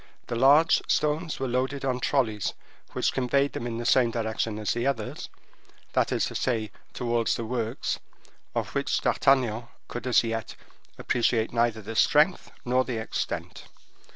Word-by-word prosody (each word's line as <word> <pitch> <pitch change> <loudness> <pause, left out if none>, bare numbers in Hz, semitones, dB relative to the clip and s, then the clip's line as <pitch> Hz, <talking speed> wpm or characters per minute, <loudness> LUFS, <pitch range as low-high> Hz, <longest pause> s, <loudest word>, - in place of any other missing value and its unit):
The 120 - -4
large 145 +7 +5
stones 155 +2 0
were 135 - -1
loaded 130 +3 -1
on 125 -2 0
trollies 115 -7 0 0.4
which - - 0
conveyed 140 +2 +1
them 120 - -4
in 115 -1 -4
the 120 - -4
same 125 -1 +4
direction 110 -1 -2
as 105 -1 -1
the 120 +2 -1
others, 115 -6 -3 0.6
that - - +2
is - - +1
to - - -5
say, 110 -5 -1 0.2
towards 120 -2 0
the 115 - -4
works, 115 -1 -2 0.6
of - - -2
which - - 0
D'Artagnan 120 -4 +2 0.2
could 120 +1 -6
as 125 - +4
yet 115 -1 -3 0.4
appreciate 115 -2 +1
neither 115 -2 +1
the 115 +3 -6
strength - - +3 0.2
nor 125 +1 +3
the 125 -3 -4
extent. 110 - -4
120 Hz, 155 wpm, -27 LUFS, 115-130 Hz, 0.6 s, large